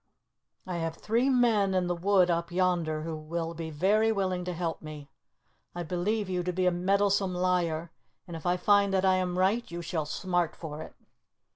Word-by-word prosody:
I 180 -2 -4
have 165 -1 -3
three 235 +5 +1
men 225 -7 +3
in 185 -1 +2
the 175 0 -1
wood 185 0 +3
up 170 +1 -1
yonder 175 -4 0
who 165 0 -4
will 165 +2 -4
be 165 -1 -5
very 205 +8 +2
willing 185 -3 -1
to 180 - -2
help 165 -1 -3
me. 150 -2 -9 0.6
I 175 - -3
believe 190 +5 -1
you 180 -1 -1
to 180 +1 -2
be 185 +1 0
a 180 - +4
meddlesome 195 +1 +1
liar, 175 -3 0 0.4
and 170 - -7
if 160 - -8
I 180 +1 +2
find 200 +1 +3
that 190 0 +2
I 185 -1 +4
am 180 -1 -1
right 200 +6 +1
you 170 0 -6
shall 160 -3 -2
smart 175 +1 -1
for 155 -2 -7
it." - - -10
180 Hz, 195 wpm, -29 LUFS, 165-195 Hz, 0.6 s, a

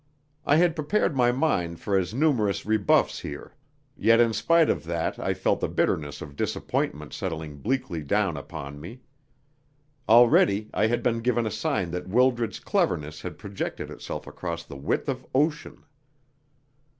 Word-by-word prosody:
I 145 - +5
had 170 0 +3
prepared 155 +1 0
my 120 -2 +4
mind 90 - 0
for 100 +2 -1
as 90 -2 +1
numerous 120 -6 +1
rebuffs 110 -1 +2
here, - - -8 0.4
yet 115 +1 +4
in 115 -1 +4
spite 165 +9 +3
of - - 0
that 85 0 -2
I - - -1
felt - - +1
the - - -1
bitterness 75 -2 -1
of 70 -1 -11
disappointment 75 +1 -2
settling 80 -5 -5
bleakly 105 - -2
down 95 +3 0
upon 70 -3 -8
me. 115 - -10 1.1
Already 110 -3 +5
I 110 - +2
had 120 +1 -1
been 115 -2 +1
given 120 0 +1
a 110 - -2
sign 135 - -1
that 90 +1 -5
Wildred's 120 0 +2
cleverness 75 0 -1
had - - -7
projected 100 -1 -5
itself - - -6
across 85 -2 -5
the - - -11
width 70 +1 -2
of - - -3
ocean. 150 +3 0
105 Hz, 155 wpm, -26 LUFS, 85-125 Hz, 1.1 s, I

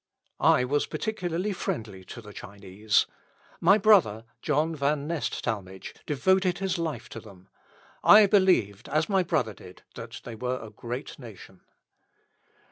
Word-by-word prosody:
I - - +4
was 145 +3 0
particularly 195 -2 -3
friendly 105 - -5
to 120 - -9
the 105 -1 -12
Chinese. 100 +2 -1 0.5
My 195 +5 +5
brother, 180 - +4 0.2
John 155 +2 0
Van 140 0 0
Nest 165 -1 -3
Talmage, 95 -3 -5
devoted 185 +5 +2
his 190 -1 -2
life 155 -8 -4
to 115 - -8
them. 95 -4 -16 0.5
I 210 0 +8
believed, 185 - +2
as 155 +2 +1
my 195 -2 +3
brother 155 - -1
did, 90 -1 -15
that 115 0 -9
they 115 - -8
were 125 +3 -3
a 110 -1 -10
great 120 +4 -7
nation. 100 -6 -13
135 Hz, 140 wpm, -27 LUFS, 110-175 Hz, 0.5 s, I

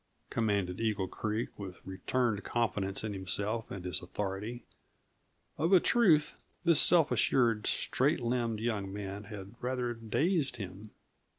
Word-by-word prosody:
commanded 100 -5 0
Eagle 105 -4 0
Creek 110 +3 -2
with 95 -2 -8
returned 105 +3 -1
confidence 105 -5 -1
in 110 -1 -3
himself 100 +4 -2
and 95 -2 -7
his 90 - -1
authority. 105 +6 -4 1.0
Of 165 +5 +2
a 185 - +9
truth, 170 -9 +3 0.3
this 170 -4 +6
self 165 -4 +5
assured, 115 -4 +2
straight 145 +5 +1
limbed 120 -2 -1
young 105 -4 -2
man 100 0 -6
had 100 -1 -8
rather 125 -1 -1
dazed 140 - 0
him. 100 -1 -8
110 Hz, 130 wpm, -32 LUFS, 100-125 Hz, 1.0 s, a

